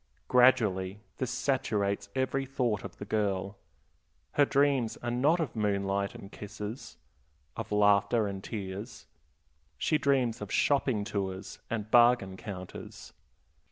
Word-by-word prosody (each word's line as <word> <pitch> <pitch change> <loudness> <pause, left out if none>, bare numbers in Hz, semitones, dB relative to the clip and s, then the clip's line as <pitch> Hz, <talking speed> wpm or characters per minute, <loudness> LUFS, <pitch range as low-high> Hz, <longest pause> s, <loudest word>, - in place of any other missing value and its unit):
Gradually 105 -6 +3 0.2
this 130 - -2
saturates 100 -8 0
every 130 +1 0
thought 125 -6 -1
of - - -8
the 105 - -7
girl; 100 -2 -1 0.7
her 145 - +4
dreams 140 -5 +2
are 120 - -1
not 145 +8 +3
of 150 -8 -2
moonlight 100 -2 0
and 100 - -10
kisses, 105 +3 -7 0.6
of - - -6
laughter 105 +2 +4
and 100 -1 -5
tears; 105 +2 -6 0.7
she 155 - +1
dreams 130 -5 +1
of 105 - -6
shopping 130 -7 +2
tours 95 -3 -4
and 110 -2 -3
bargain 120 -5 +5
counters. 95 -2 -9
105 Hz, 120 wpm, -30 LUFS, 100-125 Hz, 0.7 s, bargain